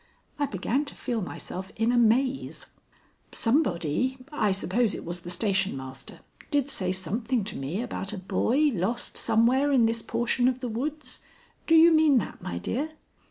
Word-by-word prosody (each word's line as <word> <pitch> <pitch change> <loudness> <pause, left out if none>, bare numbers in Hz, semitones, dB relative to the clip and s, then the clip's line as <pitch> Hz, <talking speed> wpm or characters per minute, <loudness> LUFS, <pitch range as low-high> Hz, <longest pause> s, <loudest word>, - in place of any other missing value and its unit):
I 290 - +1
began 230 +8 -1
to 285 - -7
feel 235 -3 -2
myself 185 0 -6
in 225 +2 +1
a 245 - +2
maze. 255 +4 +1 0.7
"Somebody 230 - +1
I 220 -9 +1
suppose 200 +4 0
it - - -7
was 175 +1 -4
the 175 - -9
station 190 -2 +1
master 130 0 -9 0.3
did 285 -3 +1
say 185 -8 0
something 215 +6 -1
to 200 - -6
me 155 - -3
about 195 -5 -4
a 215 - -5
boy 265 +10 +1
lost 215 +5 -2
somewhere 240 +5 +2
in 250 -4 +5
this 230 0 0
portion 240 +2 +1
of 255 0 0
the 250 -2 -4
woods. 265 +3 -4 0.5
Do 325 - +5
you 330 +1 +8
mean 310 -4 +5
that, 220 - -3
my 85 - -4
dear?" 265 - -2
230 Hz, 170 wpm, -27 LUFS, 190-265 Hz, 0.7 s, you